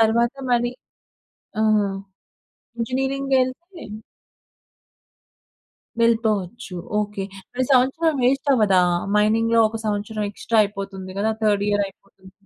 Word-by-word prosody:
తర్వాత 235 +2 +3 0.2
మరి 240 0 +2 0.9
ఆ! - - +3 1.2
ఇంజినీరింగ్ 270 +3 -1
యేళ్తే 315 +8 -2 2.2
వెళ్ళిపోవచ్చు. 220 -3 0 0.2
ఓకే. 205 -2 -3 0.3
మరి 255 +1 0
సంవత్సరం 270 +6 +3
వే‌స్ట‌వ్వదా? 245 -7 +3 0.4
మైనింగ్‌లో 225 +2 +3
ఒక 225 +1 -6
సంవత్సరం 210 +1 -2
ఎక్స్‌ట్రా 225 +2 -1
అయిపోతుంది 195 -2 -7
కదా! 220 +2 +1
థర్డ్ 205 -1 +2
ఇయర్ 205 0 +2
అయిపోతుంది. 195 -1 -17
225 Hz, 90 wpm, -22 LUFS, 205-255 Hz, 2.2 s, తర్వాత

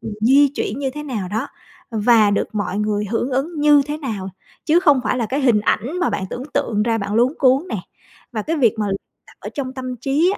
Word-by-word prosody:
ừm, 220 - -6
di 275 +5 +6
chuyển 220 +7 -3
như 270 -2 -1
thế 300 - -5
nào 220 -10 -4
đó 220 +8 -2 0.4
và 220 -1 +4
được 200 - 0
mọi 205 -1 -2
người 210 0 0
hưởng 235 +5 -2
ứng 295 +5 -2
như 295 -1 +6
thế 295 0 -3
nào, 215 -10 -4 0.4
chứ 330 +3 +4
không 290 -7 +4
phải 250 - 0
là 230 - 0
cái 275 +5 -1
hình 235 -6 +3
ảnh 255 - -1
mà 355 - +1
bạn 190 - -2
tưởng 250 - -5
tượng 210 -2 +1
ra 225 0 +1
bạn 200 0 -3
luống 245 +5 +3
cuống 275 +5 +3
nè. - - -3 0.5
Và 215 -2 -2
cái 325 +6 -2
việc 235 -6 +3
mà 210 - 0
l - - -1 0.3
tập - - -18
ở - - -6
trong 265 -3 -4
tâm 255 -1 -5
trí 290 - +1
250 Hz, 245 wpm, -20 LUFS, 215-285 Hz, 0.5 s, di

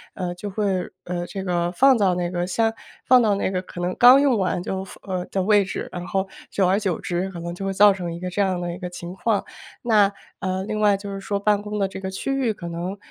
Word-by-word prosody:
呃， 180 -2 -3
就 205 +3 -6
会， 195 -2 -1
呃， 175 0 -4
这 195 -2 -5
个 175 -1 0
放 265 +6 +6
到 190 -5 +2
那 175 0 -2
个 175 0 -2
箱 225 +4 +1 0.3
放 255 -1 +6
到 210 -3 +3
那 195 - -1
个 185 -1 -1
可 180 - -10
能 180 +1 -1
刚 250 +2 +9
用 280 -3 +3
完 180 -1 0
就 190 0 -3
放 195 - -12
呃， 185 -2 -3
的 190 -1 -1
位 205 0 +4
置， 190 - -5
然 175 0 -6
后 190 0 -1 0.2
久 195 - +1
而 195 +3 +3
久 190 -6 -1
之， 180 +2 -2
可 175 -3 -8
能 170 +1 -5
就 185 - -7
会 - - 0
造 205 +1 +6
成 175 -3 -5
一 - - -7
个 180 0 -4
这 205 - 0
样 185 -2 +1
的 175 -1 -3
一 180 - -8
个 180 -1 -5
情 175 0 -8
况。 205 +2 0 0.4
那 210 -4 +3 0.3
呃， 185 0 -2
另 215 +1 -3
外 205 -1 +4
就 200 0 -6
是 195 - -5
说 200 +1 -2
办 205 0 +2
公 210 0 -5
的 195 - +2
这 190 - -7
个 190 0 -4
区 230 +8 -3
域 260 -5 +1
可 170 -4 -7
能， 175 +4 -4
190 Hz, 290 characters per minute, -23 LUFS, 180-205 Hz, 0.4 s, 刚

